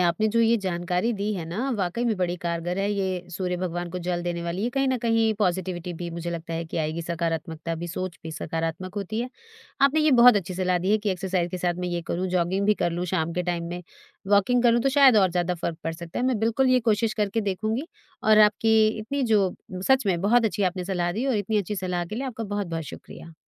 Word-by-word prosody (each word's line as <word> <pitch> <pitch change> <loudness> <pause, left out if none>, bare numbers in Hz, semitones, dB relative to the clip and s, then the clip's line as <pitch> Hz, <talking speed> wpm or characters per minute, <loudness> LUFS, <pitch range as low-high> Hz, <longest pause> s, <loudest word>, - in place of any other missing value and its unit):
आपने 175 +4 +2
जो 230 +2 +2
ये 230 0 +4
जानकारी 180 +2 -1
दी 210 0 -2
है 175 - -4
ना, 225 +11 -2
वाक़ई 195 +4 -1
में 225 -3 +1
बड़ी 180 -1 -1
कारगर 170 +2 -2
है, 200 +1 0
ये 185 -3 -2
सूर्य 180 +1 -2
भगवान 175 -1 -3
को 180 - -4
जल 175 -1 -1
देने 175 -1 -3
वाली, 170 +4 -3
ये 240 - 0
कहीं 270 0 +2
न 255 -1 +1
कहीं 225 -1 +2
पॉजिटिविटी 180 -2 -1
भी 175 +1 -5
मुझे 170 +1 -5
लगता 165 -1 -5
है 165 +1 -3
कि 160 - -7
आएगी, 160 +1 -2
सकारात्मकता 165 -1 -3
भी, 170 +2 -5
सोच 185 0 -5
भी 160 - -6
सकारात्मक 165 +3 -4
होती 205 +3 -3
है। 245 - -3 0.5
आपने 280 +3 +4
ये 305 -1 +4
बहुत 245 -4 +9
अच्छी 185 -2 -3
सलाह 180 0 +1
दी 185 +3 -1
है 215 - +4
कि 205 -1 -1
एक्सरसाइज 180 -1 -1
के 185 - -4
साथ 175 -1 0
मैं - - -1
ये 175 -1 -2
करूँ, 180 +2 -1
जॉगिंग 185 +2 0
भी 210 - +4
कर 175 - 0
लूँ 175 +1 -2
शाम 170 -2 0
के 180 - -1
टाइम 175 -1 -2
में, 175 +1 -5 0.5
वॉकिंग 205 +5 +3
करूँ, 235 0 +4
तो 270 - +3
शायद 270 -3 +6
और 190 -3 +4
ज़्यादा 175 0 0
फ़र्क 170 -1 -4
पड़ 165 - -1
सकता 165 0 -7
है। 250 - 0
मैं 255 -4 +1
बिल्कुल 230 +4 +2
ये 255 0 +4
कोशिश 215 +1 +1
करके 210 +1 0
देखूँगी 215 - -2 0.4
और 215 0 +6
आपकी 215 +1 +4 0.2
इतनी 275 +6 -2
जो 195 -3 +2 0.3
सच 265 -3 +4
में 180 -3 +1
बहुत 230 +5 +3
अच्छी 210 -2 0
आपने 185 0 0
सलाह 175 -2 -1
दी, 235 +7 -2
और 260 -5 +1
इतनी 210 +1 0
अच्छी 205 +1 -3
सलाह 180 -2 -2
के 170 - -7
लिए 265 - -3
आपका 230 -3 -5
बहुत-बहुत 195 -6 -3
शुक्रिया। 165 +3 -11
185 Hz, 245 wpm, -25 LUFS, 175-215 Hz, 0.5 s, बहुत